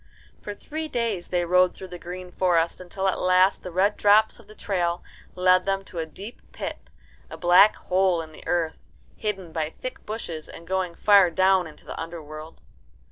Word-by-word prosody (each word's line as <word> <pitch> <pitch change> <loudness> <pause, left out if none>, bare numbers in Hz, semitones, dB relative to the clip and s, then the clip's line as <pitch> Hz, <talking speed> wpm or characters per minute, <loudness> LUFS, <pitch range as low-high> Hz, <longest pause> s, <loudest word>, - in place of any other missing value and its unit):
For 205 - -6
three 315 +8 -6
days 230 - -2
they 175 -1 0
rode 180 +1 +3
through 190 - -9
the 175 -1 -8
green 180 +1 -8
forest, 175 -2 +1
until 190 +2 -3
at 190 - 0
last 185 +1 +3
the - - -7
red 190 +4 +1
drops 210 +3 +4
of 225 - -18
the 215 - -14
trail 175 -4 -1 0.3
led 185 0 +4
them 195 0 0
to 175 - -8
a 160 - -3
deep 200 +9 -10
pit, - - -7 0.4
a - - -8
black 180 +4 +6
hole 185 -1 +1
in 160 - -12
the - - -14
earth, 165 -2 -1 0.4
hidden 195 -5 -4
by 160 -2 -2
thick 255 +9 -8
bushes 175 -8 -5
and 170 - -11
going 185 -1 -2
far 200 -2 +5
down 185 +1 +3
into 155 - -15
the - - -6
underworld. 160 -1 -9
185 Hz, 190 wpm, -25 LUFS, 170-195 Hz, 0.4 s, black